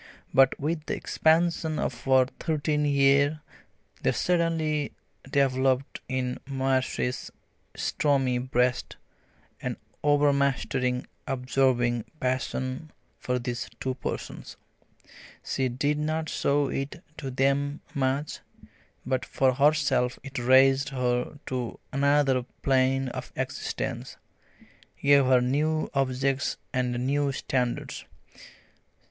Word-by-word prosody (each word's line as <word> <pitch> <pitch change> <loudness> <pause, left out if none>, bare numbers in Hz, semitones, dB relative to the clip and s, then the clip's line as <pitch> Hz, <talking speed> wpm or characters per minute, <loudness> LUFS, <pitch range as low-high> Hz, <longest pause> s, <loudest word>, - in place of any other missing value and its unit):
But 135 0 +5
with 155 +2 -2
the - - -1
expansion 160 -1 +1
of 120 - -3
her 130 -1 +5
thirteenth 150 -2 0
year 140 +2 +3 0.6
there - - +2
suddenly 165 -4 0 0.4
developed 135 0 +1
in 130 -1 -2
Marcie's 130 -2 -1 0.5
stormy 135 -4 +1
breast 125 0 0 0.6
an - - -3 0.3
overmastering 140 -3 +2 0.2
absorbing 125 -3 +1
passion 130 +3 -2 0.3
for 125 0 -1
these 120 -1 -4
two 130 - -1
persons. 125 - -6 0.9
She 130 -1 0
did 145 +4 0
not 155 +1 -1
show 145 0 +1
it 140 +6 -4
to 135 - -5
them 140 +3 0
much, 140 +2 -1 0.7
but 130 -1 0
for 130 -1 +2
herself 140 -3 +2
it 135 -2 -5
raised 135 +3 +5
her 125 +1 -1
to 125 -3 -4
another 140 -1 +3 0.2
plane 135 0 +2
of - - -7
existence, - - -4 0.8
gave 140 -1 +5
her 130 -1 +5
new 150 +5 0
objects 135 0 0 0.2
and 125 -1 -1
new 140 +1 +1
standards. 125 -2 -2
135 Hz, 100 wpm, -27 LUFS, 130-145 Hz, 0.9 s, But